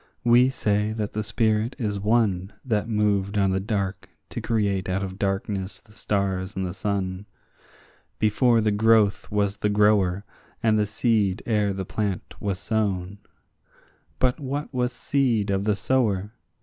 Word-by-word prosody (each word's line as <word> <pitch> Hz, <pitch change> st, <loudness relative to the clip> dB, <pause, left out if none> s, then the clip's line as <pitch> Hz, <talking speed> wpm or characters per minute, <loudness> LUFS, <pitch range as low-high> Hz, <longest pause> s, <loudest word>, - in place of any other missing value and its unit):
we 120 Hz, +2 st, +5 dB
say 105 Hz, -4 st, 0 dB
the 110 Hz, -1 st, -3 dB
spirit 110 Hz, +2 st, 0 dB
is 105 Hz, -6 st, -2 dB
one 105 Hz, -3 st, +1 dB
That 110 Hz, -2 st, 0 dB
moved 105 Hz, -2 st, +1 dB
on 100 Hz, -1 st, +3 dB
the 95 Hz, -, +1 dB
dark 100 Hz, -1 st, -3 dB, 0.2 s
to -, -, -5 dB
create 100 Hz, -5 st, 0 dB
out 95 Hz, +1 st, -1 dB
of 95 Hz, 0 st, -6 dB
darkness 95 Hz, 0 st, -2 dB
the 110 Hz, -, -23 dB
stars 100 Hz, -2 st, -2 dB
and 95 Hz, -1 st, -2 dB
the 90 Hz, -, -4 dB
sun. 100 Hz, 0 st, -3 dB, 0.9 s
Before 115 Hz, +2 st, +3 dB
the 110 Hz, -1 st, +2 dB
growth 110 Hz, -1 st, +3 dB
was 100 Hz, -1 st, 0 dB
the 105 Hz, -, 0 dB
grower, 105 Hz, -2 st, +3 dB, 0.4 s
and 110 Hz, -1 st, +3 dB
the 105 Hz, -, +1 dB
seed 105 Hz, -3 st, +1 dB
ere 105 Hz, -3 st, +1 dB
the 95 Hz, -1 st, -4 dB
plant 100 Hz, -1 st, -3 dB
was 100 Hz, -2 st, -2 dB
sown; 100 Hz, -2 st, -2 dB, 1.0 s
But 130 Hz, +3 st, +1 dB
what 145 Hz, +1 st, -4 dB
was 125 Hz, -1 st, 0 dB
seed 125 Hz, -6 st, 0 dB
of 100 Hz, 0 st, 0 dB
the 105 Hz, -1 st, +2 dB
sower? 105 Hz, -3 st, 0 dB
105 Hz, 150 wpm, -25 LUFS, 100-110 Hz, 1.0 s, we